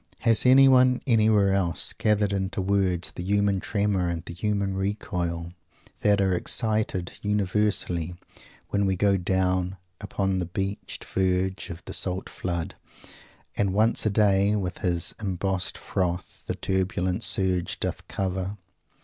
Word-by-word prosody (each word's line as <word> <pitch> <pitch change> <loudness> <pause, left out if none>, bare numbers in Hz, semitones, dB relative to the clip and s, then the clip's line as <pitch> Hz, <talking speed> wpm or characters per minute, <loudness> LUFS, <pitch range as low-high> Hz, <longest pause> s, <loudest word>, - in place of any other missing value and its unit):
Has 115 +1 +4
anyone, 130 -1 +6
anywhere 110 -5 +3
else, 95 +2 +1
gathered 105 -2 +1
into 95 0 -2
words 95 -2 +1
the - - -7
human 100 +1 +1
tremor 100 -3 0
and 85 -1 -4
the - - -7
human 100 +1 -1
recoil 90 -4 -3 0.5
that 100 -1 +3
are 95 -1 +2
excited 105 -1 -1
universally 100 -4 0 0.5
when 100 -1 +1
we 95 - +1
go 100 +1 +3
down 95 0 0 0.2
"upon 95 -2 -1
the 90 - -2
beached 95 +3 -4
verge 95 0 -1
of 85 +2 -8
the - - -7
salt 95 0 -3
flood, 85 +1 -4 0.8
who 100 - +1
once 110 +4 +2
a 110 - +2
day 100 0 +3
with 90 -3 -3
his 85 -2 0
embossed 95 -2 -1
froth 90 -1 -3
the - - -2
turbulent 95 +1 -1
surge 95 -4 0
doth - - -3
cover?" 95 +1 -3
95 Hz, 135 wpm, -26 LUFS, 90-105 Hz, 0.8 s, anyone